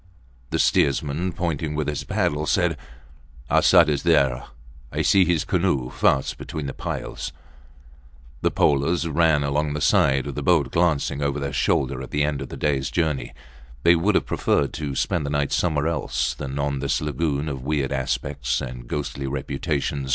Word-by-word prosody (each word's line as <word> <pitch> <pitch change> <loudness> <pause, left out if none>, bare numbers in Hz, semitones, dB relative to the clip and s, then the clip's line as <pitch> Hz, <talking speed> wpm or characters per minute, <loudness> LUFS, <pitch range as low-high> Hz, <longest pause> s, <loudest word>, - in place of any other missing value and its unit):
The - - -1
steersman, 75 +6 +1
pointing 80 -3 -2
with 75 -1 -1
his 75 -1 -2
paddle, 75 +1 -1
said, - - +2 0.8
Arsat 85 -3 +6
is 75 -2 0
there. 70 -7 +2 0.5
I - - -1
see 95 -2 +5
his 85 -3 +1
canoe 85 -9 0
fast 65 -2 +1
between 80 -3 -5
the 70 - -4
piles. - - -5 1.1
The - - +2
polers 75 +4 +2
ran 80 -2 +3
along 75 +1 0
the - - -2
sides 70 -2 +3
of - - -4
the - - -4
boat - - +2
glancing 75 -4 +1
over 70 0 -1
their 70 -1 -3
shoulders 65 0 0
at 65 - -7
the 75 +1 0
end 75 -2 -1
of 70 - -6
the - - -7
days 70 -3 0
journey. 80 -5 -1 0.5
They 85 - +7
would 95 +5 +1
have - - +2
preferred 70 - 0
to 75 -3 -4
spend 85 +3 0
the 70 - -3
night 70 -1 0
somewhere 75 -3 +1
else 65 -6 -1
than 70 0 -6
on 70 -1 -1
this 70 0 0
lagoon 75 0 -1
of 70 -3 -4
weird 70 -1 -1
aspect 65 0 -1
and 60 -2 -7
ghostly 70 0 -4
reputation. 70 0 -2
70 Hz, 175 wpm, -23 LUFS, 70-80 Hz, 1.1 s, They